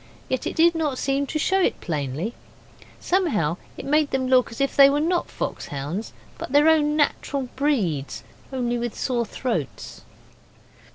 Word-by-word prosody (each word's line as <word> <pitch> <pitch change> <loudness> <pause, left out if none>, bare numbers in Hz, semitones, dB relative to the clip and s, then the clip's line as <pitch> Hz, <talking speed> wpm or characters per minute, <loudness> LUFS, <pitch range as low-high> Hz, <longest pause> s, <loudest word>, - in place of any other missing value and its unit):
Yet 260 - -1
it - - -4
did 335 +1 +5
not 305 -5 -1
seem 275 +1 0
to 310 - -2
show 380 +5 +2
it - - +1
plainly; 155 - -3 0.7
somehow 220 - +1 0.2
it - - -7
made 300 +1 +2
them 265 -1 -1
look 255 -1 +4
as 230 - -9
if 275 0 0
they 275 -1 +8
were 285 +1 +1
not 345 +3 0
fox - - -4
hounds, 145 +10 -4 0.3
but - - -6
their 290 +2 +5
own 300 -2 +3
natural 280 -3 0
breeds 210 - -1 0.3
only 240 -2 -1
with 240 -2 -4
sore 240 -3 -1
throats. 205 - -4
265 Hz, 165 wpm, -24 LUFS, 220-295 Hz, 0.7 s, they